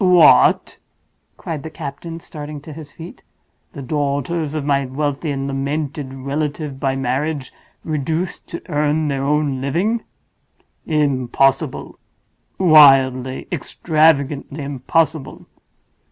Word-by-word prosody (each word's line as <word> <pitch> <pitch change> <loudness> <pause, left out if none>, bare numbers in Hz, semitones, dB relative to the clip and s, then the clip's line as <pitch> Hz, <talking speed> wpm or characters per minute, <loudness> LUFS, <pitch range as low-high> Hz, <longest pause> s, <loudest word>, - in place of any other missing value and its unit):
"What!!!" 175 -8 +5 0.6
cried 155 -3 -5
the 160 - -7
captain, 160 +2 -7
starting 150 -1 -8
to 155 +1 -10
his 155 -1 -10
feet. 170 +9 -11 0.5
"The 140 -5 -7
daughters 145 +3 -2
of 150 -2 -2
my 140 -1 +2
wealthy 145 +3 -2
and 135 -1 -2
lamented 140 0 -3
relative 140 +1 -4
by 135 -2 0
marriage 135 +2 -2 0.3
reduced 160 +4 -3
to 170 - -7
earn 150 -1 0
their 135 -1 -1
own 145 -2 0
living? 185 - 0 0.9
Impossible—wildly, 135 0 +2
extravagantly 150 -3 +1
impossible!" 145 +2 -1
145 Hz, 100 wpm, -19 LUFS, 135-155 Hz, 0.9 s, What